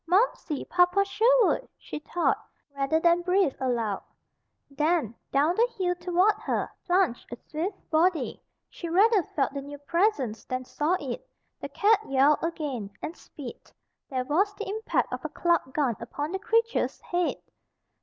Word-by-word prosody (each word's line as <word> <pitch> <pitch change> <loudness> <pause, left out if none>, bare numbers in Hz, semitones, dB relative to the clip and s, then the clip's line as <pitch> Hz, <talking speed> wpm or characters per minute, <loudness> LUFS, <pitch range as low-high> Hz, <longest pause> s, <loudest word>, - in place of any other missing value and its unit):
"Momsey! 360 - +1
Papa 360 +3 +3
Sherwood!" 485 +4 +3
she - - -7
thought, 345 +3 0 0.3
rather 280 +3 +1
than 340 +1 +4
breathed 360 -4 +2
aloud. 235 -6 -1 0.7
Then, 300 -4 +1 0.2
down 295 +5 +3
the 470 +4 +3
hill 360 -2 +1
toward 360 +3 +2
her, - - -2 0.2
plunged 355 -12 +1
a - - -3
swift 335 - -5
body. 320 -3 +2 0.3
She 340 - -7
rather 405 +4 +5
felt 275 -4 -2
the 280 - -3
new 285 +1 -8
presence 285 - 0
than 255 0 -3
saw 310 +8 0
it. 280 - -6 0.3
The - - -6
cat 420 0 +4
yowled 275 +2 +4
again, 290 -11 -3
and 330 - -4
spit. 270 -5 -11 0.4
There 255 -3 -2
was 390 +9 +1
the 430 - -5
impact 435 +3 -1
of - - -4
a - - -3
clubbed 340 -6 +1
gun 270 -7 +1
upon 295 +2 -4
the 385 - -2
creature's 455 +3 +1
head. 350 -1 0
335 Hz, 155 wpm, -27 LUFS, 280-385 Hz, 0.7 s, rather